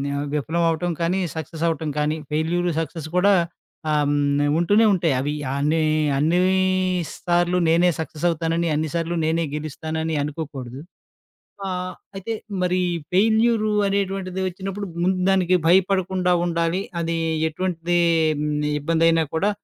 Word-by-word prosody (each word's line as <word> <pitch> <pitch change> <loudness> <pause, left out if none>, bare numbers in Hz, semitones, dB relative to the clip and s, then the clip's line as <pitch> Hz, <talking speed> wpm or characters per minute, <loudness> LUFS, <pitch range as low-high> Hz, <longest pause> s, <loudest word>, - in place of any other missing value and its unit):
ఆహ్, 145 +1 -2
విఫలం 160 +3 0
అవ్వటం 165 +2 -1
కానీ, 175 +3 +1 0.2
సక్సెసవ్వటం 160 0 -2
కానీ, 150 +1 +1 0.2
ఫెయిల్యూరు 170 +3 0
సక్సెస్ 165 -1 -5
కూడా 200 +3 +5 0.6
ఆహ్, 150 -1 +2
హ్మ్ 145 0 +1 0.2
ఉంటూనే 205 +6 +4
ఉంటాయి. 170 -5 +1
అవి 145 +3 -1 0.2
అన్ని 150 +3 +1 0.4
అన్ని 160 +5 +2 0.7
సార్లు 175 0 +1
నేనే 170 +2 +4
సక్సెసవుతానని, 165 +1 -1
అన్ని 155 +1 -1
సార్లు 170 +1 -1
నేనే 165 +1 +1
గెలుస్తానని 160 +1 -3
అనుకోకూడదు. 140 -4 -6 0.9
ఆహ్, 185 0 -4 0.2
అయితే 195 +4 -4 0.3
మరి 180 0 +1 0.3
ఫెయిల్యూరు 220 +2 +3 0.2
అనేటువంటిది 195 -1 -2
వచ్చినప్పుడు 195 +2 -5 0.2
ముందు 185 +1 +1
దానికి 185 -1 +3
భయపడకుండా 185 0 +2
ఉండాలి. 170 +2 0 0.2
అది 165 0 -1 0.3
ఎటువంటీ 175 +1 -1 0.8
ఇబ్బందయినా 165 +1 +2
కూడా 195 +6 +2
170 Hz, 115 wpm, -22 LUFS, 160-185 Hz, 0.9 s, కూడా